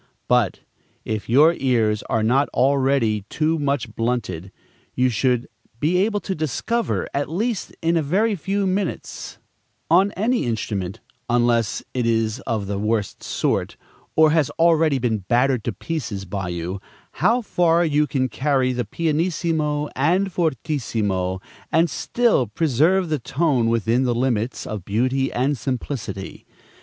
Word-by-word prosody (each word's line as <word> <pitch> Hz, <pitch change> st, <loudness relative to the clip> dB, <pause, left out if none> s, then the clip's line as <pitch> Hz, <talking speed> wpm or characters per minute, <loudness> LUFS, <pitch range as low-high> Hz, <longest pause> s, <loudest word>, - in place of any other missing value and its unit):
But, -, -, +2 dB, 0.4 s
if 110 Hz, -1 st, -3 dB
your 150 Hz, +7 st, +6 dB
ears 115 Hz, -8 st, +1 dB
are 110 Hz, -, +1 dB
not 130 Hz, +6 st, +2 dB
already 135 Hz, -5 st, +2 dB
too 160 Hz, +1 st, 0 dB
much 140 Hz, -6 st, -1 dB
blunted, 100 Hz, -7 st, -2 dB, 0.4 s
you 130 Hz, 0 st, +3 dB
should 125 Hz, +1 st, +1 dB, 0.3 s
be 165 Hz, +6 st, +2 dB
able 205 Hz, +2 st, +1 dB
to 195 Hz, -, -3 dB
discover, 160 Hz, -, -1 dB
at 140 Hz, 0 st, -1 dB
least 215 Hz, +5 st, -2 dB
in 165 Hz, +1 st, +2 dB
a 165 Hz, -, +3 dB
very 200 Hz, +9 st, +1 dB
few 195 Hz, +3 st, -1 dB
minutes, 190 Hz, -1 st, -3 dB, 0.5 s
on 190 Hz, +4 st, +5 dB
any 230 Hz, -, 0 dB
instrument, 100 Hz, -5 st, -3 dB, 0.3 s
unless 120 Hz, -2 st, +1 dB
it 125 Hz, -2 st, 0 dB
is 115 Hz, 0 st, +1 dB
of 110 Hz, -4 st, -1 dB
the 100 Hz, 0 st, -3 dB
worst 105 Hz, -1 st, -1 dB
sort, -, -, -1 dB, 0.4 s
or 155 Hz, -1 st, +6 dB
has 155 Hz, -4 st, +2 dB
already 165 Hz, -3 st, +4 dB
been 115 Hz, -4 st, 0 dB
battered 120 Hz, +5 st, +1 dB
to 120 Hz, -, 0 dB
pieces 110 Hz, -, -4 dB
by 95 Hz, -1 st, -4 dB
you, 90 Hz, +2 st, -4 dB, 0.4 s
how 240 Hz, +2 st, +3 dB
far 170 Hz, -3 st, +2 dB
you 150 Hz, -1 st, +2 dB
can 130 Hz, -3 st, 0 dB
carry 130 Hz, -1 st, +1 dB
the 125 Hz, -1 st, -2 dB
pianissimo 155 Hz, -, 0 dB
and 180 Hz, +8 st, +1 dB
fortissimo, 110 Hz, -, -1 dB, 0.3 s
and 165 Hz, +2 st, +3 dB
still 235 Hz, -, +1 dB
preserve 160 Hz, -, +2 dB
the 155 Hz, -2 st, 0 dB
tone 130 Hz, -2 st, +1 dB
within 115 Hz, +2 st, +1 dB
the 125 Hz, -2 st, +1 dB
limits 120 Hz, -1 st, -1 dB
of 105 Hz, -4 st, -5 dB
beauty 130 Hz, +7 st, 0 dB
and 130 Hz, +2 st, 0 dB
simplicity. 125 Hz, -5 st, -5 dB
130 Hz, 140 wpm, -22 LUFS, 115-165 Hz, 0.5 s, your